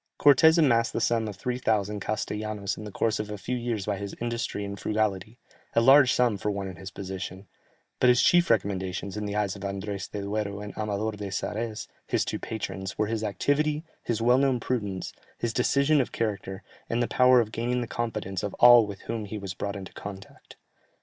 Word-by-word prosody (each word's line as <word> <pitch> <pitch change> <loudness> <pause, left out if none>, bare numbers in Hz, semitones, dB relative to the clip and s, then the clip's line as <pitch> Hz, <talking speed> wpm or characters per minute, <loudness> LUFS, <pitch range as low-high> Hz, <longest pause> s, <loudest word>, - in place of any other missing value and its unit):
Cortès 160 +3 +6
amassed 120 -8 +3
the - - -1
sum 115 -2 +1
of 105 - -6
3000 105 -2 -1
castellanos 105 -1 -3
in 105 - -8
the 105 - -7
course 110 +2 0
of 105 0 -4
a 105 - -5
few 125 +5 -3
years 115 -5 -2
by 105 -2 -1
his 100 0 -6
industry 115 -3 -3
and 100 -1 -6
frugality, 105 0 -1 0.4
a - - +6
large 135 +1 +7
sum 120 -2 +2
for 105 - -2
one 100 -1 -3
in 95 -2 -8
his 95 +2 -8
position, 95 0 -6 0.5
but 125 - +5
his 125 -1 +5
chief 175 0 +4
recommendations 95 -3 -1
in 105 0 -3
the 100 - -4
eyes 105 -2 0
of 100 - -10
Andrès 100 0 -4
de 100 -1 -5
Duero 100 0 -2
and 105 0 -8
Amador 105 0 -2
de 105 -1 -6
Sarès 105 +3 -3 0.2
his - - +1
two - - -3
patrons, 95 -3 -5
were 110 - +2
his 110 0 -2
activity, 150 +8 0 0.2
his 115 -1 -2
well 125 +2 +5
known 135 -3 +2
prudence, 105 -7 -3 0.2
his 120 -1 -2
decision 140 +4 +3
of 125 - -4
character, 100 -3 -3 0.3
and 120 +1 +1
the - - -1
power 125 0 +5
of 110 -2 0
gaining 120 +2 -1
the - - -2
confidence 110 -5 -3
of 100 - -4
all 120 -2 +8
with 100 -2 -8
whom 115 -2 -4
he 105 +2 -6
was 100 -3 -5
brought 100 +3 -4
into 95 -2 -8
contact. 100 -1 -10
105 Hz, 205 wpm, -27 LUFS, 100-120 Hz, 0.5 s, all